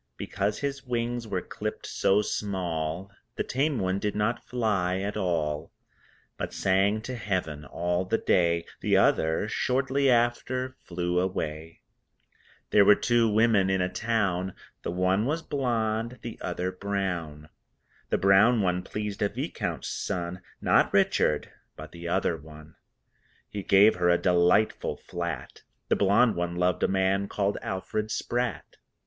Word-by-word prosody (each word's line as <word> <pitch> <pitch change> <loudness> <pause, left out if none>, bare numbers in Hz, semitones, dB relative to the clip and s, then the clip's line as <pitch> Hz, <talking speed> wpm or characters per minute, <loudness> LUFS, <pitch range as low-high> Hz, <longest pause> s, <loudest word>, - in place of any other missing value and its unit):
Because 100 +1 -2
his 140 -1 -3
wings 120 -2 -2
were 95 -4 -2
clipped - - -5
so 100 +2 +2
small 90 -3 -3 0.2
The - - -1
tame 140 +2 0
one 95 -1 0
did 105 0 -2
not 105 +3 0
fly 100 -7 0
at 100 +2 -3
all, 80 -6 -1 0.7
But - - -4
sang 100 +3 +2
to 130 +2 -5
Heaven 90 -9 -3
all 90 +4 -1
the 115 - +1
day 85 -4 +2
The - - +2
other 80 +6 +2
(shortly 135 +4 +1
after) 125 +2 +1
flew 90 0 -1
away. 80 -3 -3 0.9
There 105 - +7
were 105 - +7
two 120 0 +2
women 110 -3 +3
in 95 0 +1
a 90 0 -1
town, 95 -5 0 0.3
The - - -4
one 95 +5 +1
was 160 +3 -1
blonde, 115 -3 -1
the 115 - -7
other 90 +1 -2
brown. 90 -6 -3 0.6
The - - +2
brown 100 +5 +5
one 90 -1 +1
pleased 105 +1 -5
a 105 - +2
Viscount's - - -4
son 90 -1 -3 0.2
(Not - - +3
Richard, - - +2 0.2
but - - -10
the 85 0 -8
other 85 -1 0
one) 75 0 -13 0.7
He 105 - -5
gave 100 +2 +5
her 90 -1 +2
a 85 - +5
delightful 90 +4 +2
flat 85 -1 -6 0.3
The - - +4
blonde 105 +4 +4
one 85 0 -2
loved 90 -1 +1
a - - +3
man 95 +1 +1
called 100 0 -1
Alfred 105 +3 -3
Spratt. 120 +1 -3
95 Hz, 145 wpm, -27 LUFS, 90-110 Hz, 0.9 s, There